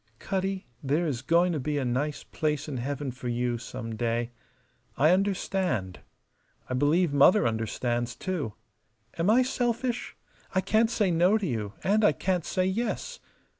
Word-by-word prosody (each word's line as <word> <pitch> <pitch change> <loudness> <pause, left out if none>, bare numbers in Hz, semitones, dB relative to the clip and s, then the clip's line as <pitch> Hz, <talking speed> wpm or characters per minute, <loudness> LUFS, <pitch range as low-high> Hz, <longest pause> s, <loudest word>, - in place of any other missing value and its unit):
"Cutty, 190 +3 -2 0.2
there 150 +5 +1
is 135 -7 -2
going 170 +5 +3
to 155 - -1
be 150 +2 -2
a 135 - -1
nice 140 +5 -1
place 150 -1 -2
in 140 -4 -4
heaven 140 +2 -3
for 125 0 -7
you 120 0 -1
some 115 -1 -6
day. 115 +1 -1 0.7
I 155 +4 +5
understand. 185 - 0 0.7
I - - -3
believe 145 +5 +2
Mother 145 - +6
understands, 120 +2 -1
too. 155 - -3 0.7
Am 170 +4 +2
I 245 +4 +5
selfish? 245 -1 -2 0.4
I 190 - +4
can't 220 +3 +3
say 210 -5 +1
No 175 +5 +4
to 210 - -3
you 110 - -3
and 210 +3 +3
I 210 - +5
can't 180 -4 -1
say 185 - 0
Yes. 215 +6 -2
150 Hz, 160 wpm, -28 LUFS, 120-190 Hz, 0.7 s, Mother